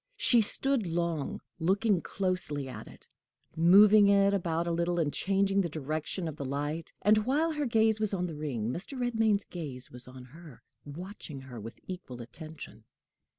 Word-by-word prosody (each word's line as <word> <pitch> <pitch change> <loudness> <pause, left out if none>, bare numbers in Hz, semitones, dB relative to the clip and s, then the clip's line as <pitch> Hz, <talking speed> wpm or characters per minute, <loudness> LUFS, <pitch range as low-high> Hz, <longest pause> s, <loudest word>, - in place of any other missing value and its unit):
She 240 -2 +5
stood 250 0 +1
long, 170 -3 -2 0.2
looking 195 +2 +2
closely 180 -8 -2
at 130 - -8
it, - - -15 0.5
moving 200 +5 +7
it 200 0 +4
about 170 -3 0
a 170 - -1
little, 170 +1 0
and 155 -4 0
changing 195 0 +2
the 175 - -2
direction 155 +4 -3
of 155 -2 -6
the - - -4
light; 145 +4 -3
and, 215 +1 +5
while 285 +9 +1
her 300 -3 -1
gaze 220 -2 +3
was 215 -2 +1
on 180 -3 -1
the 170 - -5
ring, 130 -7 -3
Mr. 205 - -6
Redmain's 225 -4 +1
gaze 135 -7 -6
was 125 0 -3
on 130 0 -11
her, 150 +1 -14 0.2
watching 155 -1 -8
her 130 -3 -9
with 115 +2 -9
equal 175 -10 -8
attention. 155 +7 -10
170 Hz, 170 wpm, -30 LUFS, 145-200 Hz, 0.5 s, moving